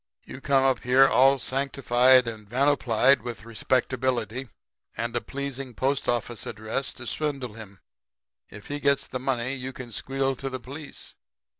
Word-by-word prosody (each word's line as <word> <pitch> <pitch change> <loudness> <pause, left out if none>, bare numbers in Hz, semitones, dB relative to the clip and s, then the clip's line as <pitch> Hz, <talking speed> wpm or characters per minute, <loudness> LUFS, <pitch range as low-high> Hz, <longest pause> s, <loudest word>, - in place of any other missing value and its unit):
You 135 - -9
come 135 -1 +3
up 135 -1 +3
here 130 +2 +5
all 135 +1 +5
sanctified 130 -2 +3
and 110 -3 -7
vanoplied 135 -1 +3
with 115 -1 -7
respectability 125 +1 -1 0.5
and 115 0 -3
a - - +1
pleasing 135 -2 -5
post 135 +4 0
office 120 -1 -2
address 110 +5 -3
to 120 - -10
swindle 135 -4 -2
him. 105 -3 -11 0.7
If 105 0 -12
he 145 0 -4
gets 140 -1 +2
the 130 - -5
money 130 -1 -1
you 130 -1 -5
can 125 -2 -9
squeal 135 +4 -1
to 135 - -4
the 130 0 -5
police. 140 +4 -8
130 Hz, 155 wpm, -26 LUFS, 120-135 Hz, 0.7 s, here